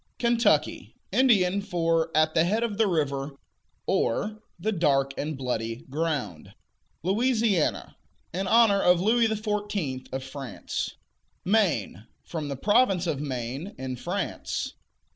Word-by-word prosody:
Kentucky 235 0 +1 0.2
Indian 200 -7 +4
for 165 -4 0
"at 155 0 +3
the 160 - +4
head 215 +7 +1
of 220 -3 -3
the 220 - +4
river," 140 -5 -1 0.5
or 215 - 0 0.2
"the 215 +6 0
dark 140 -7 +2
and 150 -1 -3
bloody 115 -2 -3
ground." 145 - -3 0.5
Louisiana 220 - +1 0.4
In 190 +2 -2
honor 215 -2 +5
of 180 -1 +5
Louis 225 +5 +3
XIV. 205 - -3
of 130 0 -3
France. 135 -1 -5 0.5
Maine 160 - +1 0.2
From 160 -3 -5
the 140 -2 -4
province 195 - +3
of 150 -5 -1
Maine, 135 - -4
in 130 -1 -4
France. 180 +10 -3
170 Hz, 125 wpm, -27 LUFS, 140-210 Hz, 0.5 s, honor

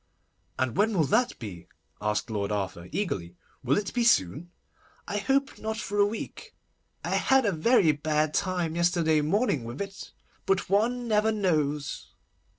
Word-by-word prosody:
'And 130 -3 -1
when 210 0 +2
will 160 - +4
that 220 - +1
be?' 90 -7 -8 0.3
asked 105 +3 -1
Lord 100 -1 -2
Arthur 95 -4 -3
eagerly. 90 - -3 0.3
'Will 130 +2 +2
it 205 -1 -2
be 245 - +1
soon?' 155 - +2 0.6
'I 205 - -2
hope 270 +5 0
not 220 0 -3
for 205 -1 -3
a 205 - +5
week. 220 +2 -7 0.5
I - - -2
had 265 -2 +3
a 205 - +3
very 175 0 +4
bad 150 +1 0
time 180 -4 -1
yesterday 170 -3 +2
morning 155 - +1
with 120 +3 -7
it. 195 -1 -6 0.4
But 195 -1 +1
one 240 +4 +1
never 215 0 +3
knows. 150 -8 -1
175 Hz, 155 wpm, -27 LUFS, 140-210 Hz, 0.6 s, a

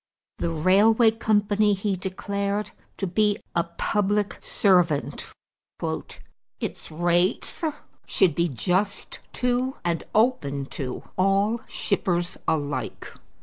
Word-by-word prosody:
The - - 0
railway 205 +8 +5
company 210 -2 +2
he 195 0 -1
declared 200 +2 -2 0.3
to 195 - -1
be 205 +3 +2 0.2
a 170 - +3
public 205 +4 -1
servant. 180 -7 +2 1.3
"Its - - -5
rates 175 - +1 0.4
should 180 -5 +3
be 170 +3 +1
just 185 - -1
to 250 +1 0
and 170 -1 0
open 155 - +2
to 130 -3 -4 0.2
all 200 +4 +2
shippers 175 -3 -1
alike." 145 -2 -2
195 Hz, 100 wpm, -25 LUFS, 170-210 Hz, 1.3 s, railway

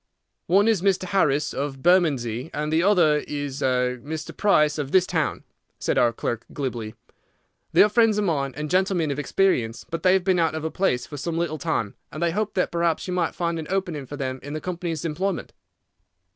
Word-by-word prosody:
"One 195 +5 +4
is 220 -6 +3
Mr. 190 -1 +2
Harris, 150 -6 +1
of 135 -1 -4
Bermondsey, 145 -8 +2
and 150 +1 -2
the 160 - +3
other 175 -6 +4
is 145 -2 -4
Mr. 130 +4 -1
Price, 150 -7 +3
of 140 -2 -3
this 185 -1 +5
town," 160 -5 -1 0.3
said - - 0
our 120 - +4
clerk, 115 0 -3
glibly. 120 -6 -4 0.8
"They - - +7
are - - +5
friends 225 -1 +3
of 210 - +1
mine 140 -7 0
and 150 0 -3
gentlemen 180 -3 +1
of 140 - -3
experience, 145 -9 0
but 165 -1 -3
they 185 +1 +4
have 190 -1 +2
been 185 -1 +2
out 165 -1 +1
of 160 - -4
a 160 - -2
place 125 -11 0
for 145 - -8
some 165 +3 -3
little 165 -2 -2
time, 140 - -1 0.2
and 155 +3 -4
they 170 - +2
hoped 210 +3 -2
that 180 - +1
perhaps 170 0 0
you 180 - -2
might 175 -2 0
find 170 -1 -1
an 155 - -6
opening 180 -8 -2
for 145 - -7
them 130 -2 -3
in 145 +1 -7
the 155 - -3
company's 170 -1 -4
employment." 180 +4 -2
160 Hz, 205 wpm, -24 LUFS, 140-185 Hz, 0.8 s, They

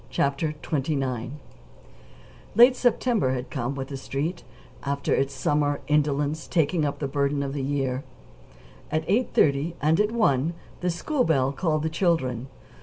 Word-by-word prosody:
CHAPTER 140 +2 0
XXIX 135 -5 -2 1.2
Late 245 +3 +8
September 235 - +2
had 125 0 -5
come, 130 0 -2
with 135 -1 -5
the 140 - -5
Street, 140 +6 -3 0.4
after 140 0 -1
its 135 0 +1
summer 145 +2 0
indolence 150 +1 +1
taking 165 -1 +1
up 145 0 -2
the 140 - -2
burden 140 +1 0
of 135 -1 -4
the 140 - -2
year. 135 -1 -1 0.9
At 155 +1 0
eight 230 +7 +1
thirty 145 +4 +3
and 155 +2 +2
at 210 +1 +2
one 165 - +2 0.2
the 180 - 0
school 250 - 0
bell 135 - +2
called 155 +1 0
the 160 - 0
children. 135 -8 0
145 Hz, 150 wpm, -25 LUFS, 135-165 Hz, 1.2 s, Late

